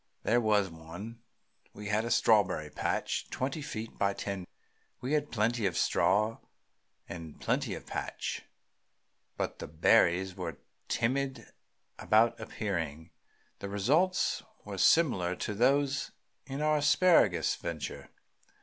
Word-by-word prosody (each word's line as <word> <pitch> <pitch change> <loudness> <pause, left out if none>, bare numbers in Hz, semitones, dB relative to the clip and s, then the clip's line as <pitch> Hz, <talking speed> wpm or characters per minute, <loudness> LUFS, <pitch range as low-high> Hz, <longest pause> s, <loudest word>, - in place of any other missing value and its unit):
There 120 +2 +3
was 105 -3 +3
one. 85 +8 -9 0.5
We 105 0 -7
had 105 +2 +1
a - - -3
strawberry 100 -9 +3
patch - - -2
twenty 135 +4 -3
feet 115 -6 -6
by 100 0 +1
ten. 95 -3 -4 0.5
We 130 +4 -3
had 150 -1 +1
plenty 115 0 +1
of 85 - -3
straw 110 +2 +2 0.7
and 80 -3 -8
plenty - - -1
of - - -9
patch, - - -4 1.0
but - - -3
the - - -6
berries 85 +4 +3
were 85 -5 -5 0.3
timid 135 +3 -1 0.5
about 115 +2 +3
appearing. 80 -6 -4 0.5
The 100 - -5
results 150 - +2 0.2
were - - -6
similar 95 - +4
to 105 - -3
those 135 +5 +2 0.4
in 140 +2 -3
our 155 0 +3
asparagus 155 +4 +4
venture. - - -6
110 Hz, 120 wpm, -31 LUFS, 95-135 Hz, 1.0 s, similar